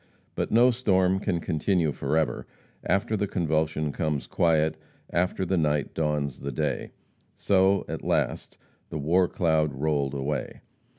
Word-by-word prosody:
But - - -2
no 120 +3 +5
storm 95 -6 +2
can 95 -4 -1
continue 80 0 0
forever; 75 +3 -1 0.4
after 110 +3 0
the 105 0 -1
convulsion 80 -3 0
comes 75 -2 -2
quiet; 80 -2 +2 0.4
after 90 +2 0
the 95 +1 0
night 75 -2 0
dawns 75 -4 -1
the 70 - -4
day 75 0 -2 0.5
so, 95 0 +2
at - - -5
last, - - -1 0.3
the - - -4
war 85 +5 +2
cloud 80 -4 +1
rolled 70 -1 0
away. 70 -1 -3
80 Hz, 135 wpm, -26 LUFS, 75-95 Hz, 0.5 s, no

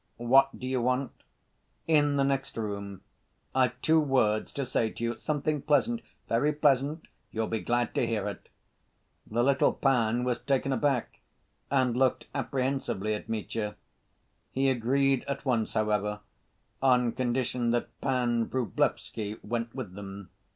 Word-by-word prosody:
"What 125 +3 +4
do - - -7
you 130 -1 0
want?" 130 +2 0 0.7
"In 145 -3 +3
the 140 - +3
next 135 -2 -1
room, 100 -3 -4 0.5
I've 130 -1 +2
two 160 0 +5
words 125 -8 +2
to 140 - -2
say 115 -3 0
to 115 - -7
you, 115 0 0
something 150 -1 -1
pleasant, 230 - +2 0.3
very 145 +7 +2
pleasant. 145 +2 +1 0.2
You'll 110 0 -1
be 110 0 -2
glad 120 +1 0
to - - +1
hear - - -1
it." - - -7 0.8
The 120 +2 +1
little 135 0 +3
pan 120 -3 +2
was 125 -1 -1
taken 135 -1 +1
aback 135 -3 0 0.5
and 130 -3 +2
looked 130 0 +2
apprehensively 130 -6 -1
at 105 - -5
Mitya. 110 -1 -3 0.8
He 135 0 +2
agreed 135 +2 +2
at 140 0 -4
once, 120 -4 0
however, 105 -1 0 0.6
on 125 -3 +4
condition 125 -1 0
that 120 0 -2
Pan 120 -4 +1
Vrublevsky 110 -3 -1
went 115 +1 -3
with 120 -9 -5
them. 100 -1 -9
125 Hz, 145 wpm, -29 LUFS, 115-135 Hz, 0.8 s, two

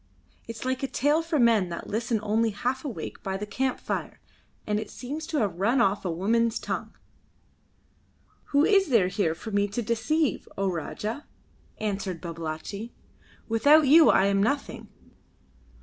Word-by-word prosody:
It 230 - -6
is 225 - -8
like 260 0 -1
a 270 - -1
tale 295 +4 +2
for 330 -1 -1
men 230 -7 +3
that 170 - -6
listen 230 +1 -1
only 220 +2 +1
half 245 +5 -2
awake 230 - -6
by 190 -1 -3
the 210 - -5
camp 255 +5 -2
fire, - - -4 0.5
and 210 0 0
it 215 - -6
seems 295 +5 -6
to 315 - -2
have 195 -8 -1
run 230 +7 +2
off 205 -4 +2
a 185 - -2
woman's 225 +7 +1
tongue." - - -5 1.5
"Who 285 +1 +3
is 390 -2 +4
there 215 -8 +4
here 165 -4 0
for 220 - -8
me 200 0 +2
to 210 +4 -3
deceive, 245 +7 0
O 195 -1 0
Rajah?" 210 - -5 0.5
answered 195 -4 -3
Babalatchi. 170 +6 -6 0.6
"Without 285 +7 +5
you 315 +3 +7
I - - +5
am 195 0 +2
nothing. 280 +7 -2
225 Hz, 165 wpm, -26 LUFS, 195-265 Hz, 1.5 s, you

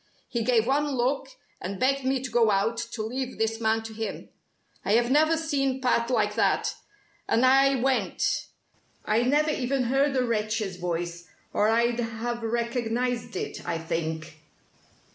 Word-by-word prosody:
He 235 - -2
gave 230 -1 +3
one 290 +3 +1
look, 265 +2 0 0.3
and 190 +1 -5
begged 275 +1 +2
me 260 0 0
to 255 - -5
go 230 -1 +4
out 210 +3 +1
to 235 -1 -4
leave 255 +3 -4
this 225 +1 -1
man 220 0 +1
to 225 0 -8
him. 220 0 -5 0.5
I 200 - +1
had 240 +2 +3
never 315 +3 +4
seen 275 -5 0
Pat 245 -2 +1
like 215 -4 +1
that 225 - +1 0.5
and 235 +3 +3
I 270 +1 +5
went. 265 +1 0 0.6
I 215 +2 +2
never 295 +5 +2
even 265 -1 0
heard 270 +3 +2
the 255 - +2
wretch's 215 -4 -1
voice 175 0 -4 0.3
or 210 - +3
I'd 235 +1 +2
have 235 +1 -3
recognized 235 +1 -1
it, - - -4
I 170 - -2
think. 160 -1 -4
235 Hz, 160 wpm, -27 LUFS, 220-260 Hz, 0.6 s, I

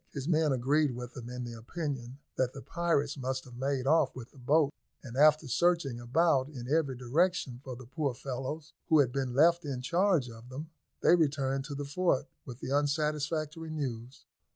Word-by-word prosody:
His 140 -1 -5
men 160 -3 +3
agreed 135 +2 +2
with 125 0 -7
him 120 -2 -7
in 125 0 -5
the 120 -1 -6
opinion 130 +1 -5 0.2
that 130 -1 0
the 135 - -8
pirates 165 -4 0
must 130 0 -2
have 125 - -13
made 135 +1 -1
off 155 -1 +3
with 125 -1 -9
the 140 - -17
boats; 145 +3 +2 0.3
and, 125 -3 -8
after 150 +2 +5
searching 160 -3 +1
about 135 +2 +2
in 125 -5 -8
every 145 -2 +1
direction 130 0 0
for 130 -3 -6
the 130 +1 -11
poor 140 0 -2
fellows 135 +5 -5 0.2
who 160 - +6
had 135 -5 +4
been 130 -2 -2
left 170 +4 +5
in 140 -4 -3
charge 175 -1 +2
of 115 +1 -11
them, 150 +5 -7 0.3
they - - +6
returned 135 -4 +1
to 145 - -5
the 145 0 -4
fort 145 0 +1 0.2
with 125 0 -9
the - - -4
unsatisfactory 150 +2 0
news. 130 -5 -5
140 Hz, 190 wpm, -31 LUFS, 125-155 Hz, 0.3 s, who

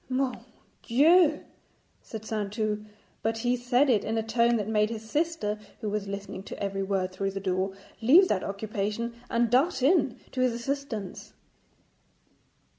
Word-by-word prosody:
'Mon 255 -1 0 0.4
Dieu!' 305 +5 +4 0.6
said 220 -1 -8
Saintou, 210 0 -2 0.4
but 225 0 0
he 245 +2 +1
said 250 +3 +2
it 230 -6 +3
in 225 +1 -1
a 225 - 0
tone 235 +1 +2
that 210 -3 -1
made 215 -1 +2
his 220 -1 -6
sister, 300 -7 -1 0.2
who 215 - -4
was 210 -1 -2
listening 200 -1 -6
to - - -8
every 195 -1 -2
word 190 -1 -1
through 195 +1 -2
the 195 0 -4
door, 190 0 -1 0.3
leave 320 - +7
that 190 - 0
occupation 210 +3 -3 0.2
and 235 -1 +1
dart 270 +3 +3
in 275 -5 +3
to 255 - -2
his 255 -2 +3
assistance. 235 -5 -4
225 Hz, 155 wpm, -28 LUFS, 205-255 Hz, 0.6 s, leave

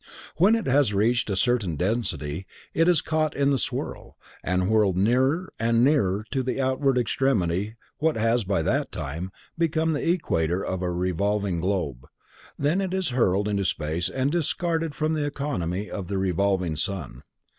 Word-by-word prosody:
When 195 +8 +5
it 225 - -2
has 130 -5 +3
reached 115 +3 +2
a 100 - 0
certain 110 -6 +1
density 90 - -2 0.3
it 165 - +3
is 175 -4 +4
caught 155 -1 0
in 140 0 +2
the 135 - +2
swirl, - - -4 0.3
and 90 +1 0
whirled 105 -4 +3
nearer 130 - +2
and 115 +1 +3
nearer 105 -8 +2
to 135 - 0
the 130 +1 -2
outward 130 0 +1
extremity 105 -7 +1
of 110 - -12 0.3
what 155 -2 +1
has, 115 +1 +2
by 95 -4 0
that - - 0
time, 80 +7 -5 0.3
become 160 -1 +1
the 150 - -1
equator 90 - 0
of 95 -1 -3
a 90 - -1
revolving 95 +1 0
globe. 85 -9 -2 0.5
Then 155 +7 +1
it 190 -1 -2
is 190 -5 0
hurled 105 -5 +2
into 100 -1 0
space 85 0 -1
and 130 +7 0
discarded 165 -1 -1
from 155 +1 0
the 155 -2 0
economy 105 - -2
of 100 -4 -5
the 100 - -2
revolving 95 -3 0
sun. 90 -3 -4
110 Hz, 170 wpm, -25 LUFS, 95-145 Hz, 0.5 s, When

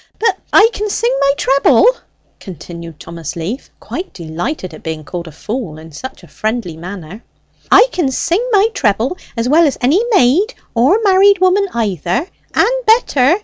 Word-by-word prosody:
"But 455 - 0
I 420 - +7
can 420 +1 -3
sing 475 +4 0
my 275 - +3
treble!" 275 - +3 0.5
continued 170 -3 -10
Thomas 165 -2 -7
Leaf, 185 +11 -5
quite 370 +2 -7
delighted 175 - -5
at - - -11
being 160 -1 -5
called 170 +2 -6
a - - -9
fool 200 - -5
in 160 +1 -12
such 260 - -9
a - - -14
friendly 215 -6 -3
way; 180 +3 -9 0.5
"I - - +8
can 335 -7 0
sing 340 - 0
my 415 +1 +4
treble 235 - 0 0.2
as 230 +1 0
well 315 +4 +5
as 280 - -2
any 280 - +3
maid, 370 - +3 0.2
or 255 - +3
married 400 0 +5
woman 375 +2 +2
either, 225 - -1 0.3
and - - +1
better! 335 - +4
250 Hz, 165 wpm, -15 LUFS, -, 0.5 s, I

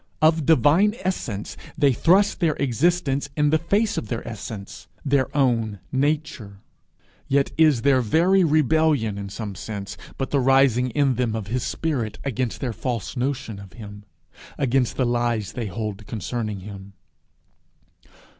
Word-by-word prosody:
Of 155 -1 +3
divine 165 - +4
essence, 125 - -3 0.2
they 140 -2 +4
thrust 190 - +3
their 165 -5 +2
existence 140 +1 0
in 150 -1 +3
the 160 - +3
face 205 +6 0
of - - -8
their 115 +2 -4
essence, 110 -2 -8 0.2
their 135 -1 +2
own 115 -6 +1
nature. 140 -7 -1 0.7
Yet 140 0 +2
is 155 -7 +4
their 135 -2 +4
very 175 - +3
rebellion 150 -8 +2
in 100 -1 -6
some 105 0 -6
sense 100 +1 -6 0.2
but 135 - -3
the 140 - +2
rising 130 -1 +3
in 135 -1 +1
them 120 -3 0
of 105 -3 -5
his 130 - 0
spirit 130 -9 -2
against 130 -4 -2
their 125 -4 -2
false 120 +1 -4
notion 125 -5 -3
of 100 -2 -12
him 105 -2 -10 0.5
against 130 -3 +1
the 130 - +2
lies 120 -3 0
they 120 -3 -4
hold 105 0 -5
concerning 110 -2 -4
him. 100 0 -10
130 Hz, 145 wpm, -23 LUFS, 110-150 Hz, 0.7 s, divine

